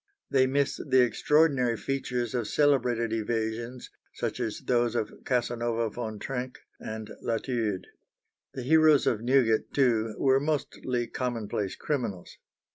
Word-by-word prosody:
They 130 -1 +4
miss 140 +1 0
the 130 -3 +3
extraordinary 135 -2 +2
features 125 -2 -2
of 120 -4 -1
celebrated 125 -6 +2
evasions, 115 +2 -3 0.2
such - - -3
as - - -3
those 120 -1 +1
of 110 - -1
Casanova 120 -2 0
Von 110 -2 -5
Trenck 130 +2 -4 0.2
and 110 0 -6
Latude. 115 -4 -1 0.7
The 130 - -4
heroes 155 +1 +5
of 110 - +1
Newgate, 120 -3 +2
too, 115 -5 +2
were 135 -1 +4
mostly 135 -4 -2
commonplace 110 -6 -3
criminals. 120 - -4
120 Hz, 120 wpm, -28 LUFS, 115-135 Hz, 0.7 s, heroes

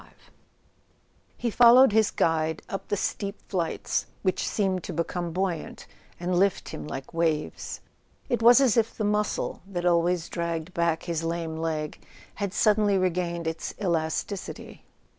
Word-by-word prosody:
XXV - - -19 1.3
H - - -8
E - - +3
followed 245 +2 +7
his 220 0 +4
guide 160 -1 0
up 195 - -5
the 205 - -1
steep 200 +2 -3
flights, 175 -4 -1 0.2
which 185 -2 0
seemed 190 -4 0
to 180 - -5
become 170 +1 -2
buoyant 180 -2 -3 0.3
and 175 0 0
lift 195 0 +1
him - - -7
like 135 +1 -7
waves. 160 -2 -1 0.5
It 240 - 0
was 240 +3 +8
as 255 -4 +3
if 225 -1 +1
the 215 - -1
muscle 210 0 -1
that 180 -3 -4
always 175 0 +2
dragged 170 0 -3
back 170 -2 0
his 165 -2 -2
lame 165 -1 -2
leg 160 -2 -3 0.4
had 200 -2 -1
suddenly 210 -1 +3
regained 175 -2 -1
its 160 0 -4
elasticity. 175 +1 -3
175 Hz, 150 wpm, -26 LUFS, 165-205 Hz, 1.3 s, was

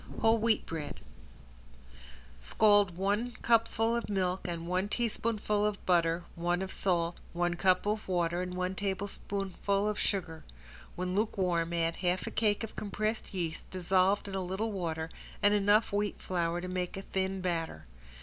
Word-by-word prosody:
~WHOLE 225 +1 +4
WHEAT 225 0 +2
BREAD~ 155 -3 -5 1.4
Scald 205 - +4
one 205 +6 0
cupful 230 0 +3
of 235 - -2
milk 185 -2 0
and 170 -1 -4
one 185 +3 0
teaspoonful 215 -2 0
of 210 -1 -1
butter, 170 -1 +3
one 175 +2 0
of 190 - -5
salt, 170 -2 0
one 175 0 +1
cup 185 +2 +3
of 210 +1 -1
water 175 -1 +1
and 180 0 -4
one 185 +1 -1
tablespoonful 200 0 -2
of 210 0 -1
sugar. 170 -5 -2 0.5
When 180 0 -2
lukewarm 180 -5 +1
add 165 -1 0
half 180 0 0
a - - -4
cake 210 -1 +1
of 225 - -6
compressed 215 +2 -2
yeast 170 -4 -4
dissolved 185 +2 +2
in 195 - -6
a 190 - -1
little 190 +5 -2
water 165 -5 -2 0.4
and 205 0 +6
enough 205 +1 +3
wheat 205 0 0
flour 175 -1 -1
to 180 - -4
make 180 0 -3
a 195 - -5
thin 190 0 -1
batter. 165 - -2
190 Hz, 160 wpm, -31 LUFS, 175-205 Hz, 1.4 s, and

